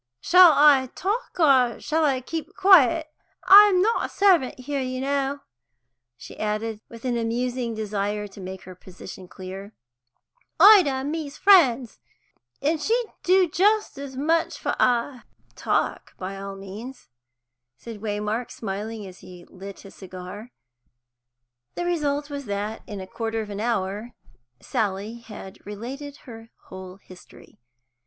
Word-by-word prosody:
"Shall 360 - +7
I 285 -3 +5
talk, 410 0 -3
or 260 -7 +4
shall 315 +2 -1
I 270 -4 +1
keep 320 +5 -6
quiet? 330 -5 +5 0.3
I'm 395 -2 +7
not 450 +3 +1
a - - -17
servant 350 -11 +2
here, 280 +1 -3
you 255 0 -4
know," 280 +1 -2 0.8
she - - -12
added, 215 +1 -3
with 230 +1 -12
an 245 -2 0
amusing 240 +1 -2
desire 210 -1 -3
to 195 0 -13
make 190 0 -8
her 185 - -11
position 185 0 -12
clear. 190 +3 -9 0.9
"Ida 405 -7 +8
and 265 +2 -3
me's 305 -3 -5
friends, 270 - +4 0.6
and 305 +2 0
she'd 465 +5 -1
do 370 0 +3
just 410 +1 +1
as 275 -2 -8
much 325 +4 0
for - - -2
I." 245 +1 +1 0.3
"Talk - - -2
by 190 +1 -6
all 195 0 -7
means," 205 +7 -10 0.7
said 225 -3 -10
Waymark, 210 +2 -3
smiling, 210 +1 -6
as 185 -1 -12
he 180 -1 -13
lit 195 +1 -10
his 195 - -14
cigar. 190 +5 -10 1.2
The 350 - -3
result 295 -4 -1
was 285 -2 -7
that, 205 +1 -4
in 205 -2 -7
a - - -7
quarter 225 +3 -4
of 210 -2 -5
an 200 - -5
hour 220 0 -3 0.4
Sally 210 +2 -3
had 210 -4 -12
related 265 +8 -8
her 225 -3 -11 0.2
whole 185 -1 -9
history. 185 - -17
240 Hz, 140 wpm, -24 LUFS, 205-295 Hz, 1.2 s, Ida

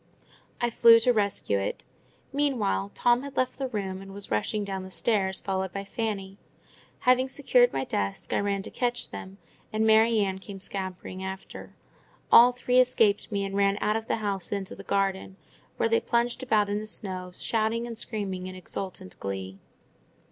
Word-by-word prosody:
I 240 0 +1
flew 230 0 +7
to 245 +2 +4
rescue 200 - 0
it. 95 - -4 0.5
Meanwhile 235 - 0
Tom 240 0 +3
had 280 0 -9
left 255 +1 0
the 270 - -1
room, 195 -5 -4
and 195 0 -10
was 200 - -5
rushing 205 - 0
down 195 -1 -4
the 185 - -8
stairs, 190 -1 0
followed 190 -1 -2
by 195 +2 -4
Fanny. 200 -2 -4 0.6
Having 255 +1 +4
secured 250 -3 +3
my 135 - -1
desk, 100 -5 -3
I - - +2
ran 200 -1 -1
to - - -8
catch 245 -1 -2
them, 190 +1 -8 0.3
and 220 +1 +1
Mary 220 +1 +5
Ann 190 -1 -1
came 195 0 -9
scampering 185 -1 -6
after. 190 0 -8 0.6
All 245 +1 +9
three 250 0 +2
escaped 230 -5 +3
me, 200 -1 -1
and 195 0 -5
ran 200 0 +3
out 210 - +1
of 225 0 -3
the - - +1
house 200 -4 -3
into 200 -2 -3
the - - -10
garden, 195 -1 -1 0.4
where - - +2
they 230 0 +3
plunged 235 +2 0
about 215 -5 +2
in 205 +1 -1
the 215 - -6
snow, 185 -4 -4
shouting 225 +1 0
and 235 -1 -6
screaming 200 -5 -4
in 185 - -7
exultant 185 - -6
glee. 95 0 -5
200 Hz, 180 wpm, -27 LUFS, 190-230 Hz, 0.6 s, All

